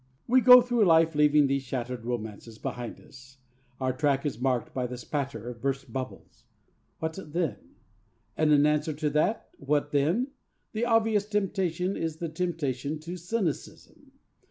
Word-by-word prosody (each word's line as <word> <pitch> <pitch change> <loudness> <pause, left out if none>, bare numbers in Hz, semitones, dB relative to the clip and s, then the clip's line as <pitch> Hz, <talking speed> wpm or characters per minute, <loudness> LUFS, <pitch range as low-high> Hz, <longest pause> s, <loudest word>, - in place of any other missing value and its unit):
We 255 +2 +5
go 250 0 +10
through 240 -3 +2
life 165 -1 +5
leaving 150 0 +4
these 140 0 +1
shattered 125 -2 -5
romances 110 -1 -5
behind 120 0 -5
us. 130 0 -16 0.4
Our 130 -1 0
track 140 +1 +1
is 125 -5 -3
marked 130 -2 0
by 125 -1 -1
the 125 0 -6
spatter 125 -3 -4
of 120 -2 -7
burst 135 -3 -3
bubbles. 130 -1 -7 0.5
What 160 +3 -4
then? 150 - -4 0.6
And 155 -1 +2
in 145 0 +5
answer 150 +1 +1
to 150 0 -2
that 155 +9 0
'What 145 +1 0
then?' 165 - +1 0.4
the 225 +2 -1
obvious 225 -3 +2
temptation 190 -3 -1
is 160 -1 -3
the 170 0 -4
temptation 155 -4 -2
to 170 +3 -6
cynicism. 180 -1 -4
150 Hz, 155 wpm, -28 LUFS, 130-175 Hz, 0.6 s, go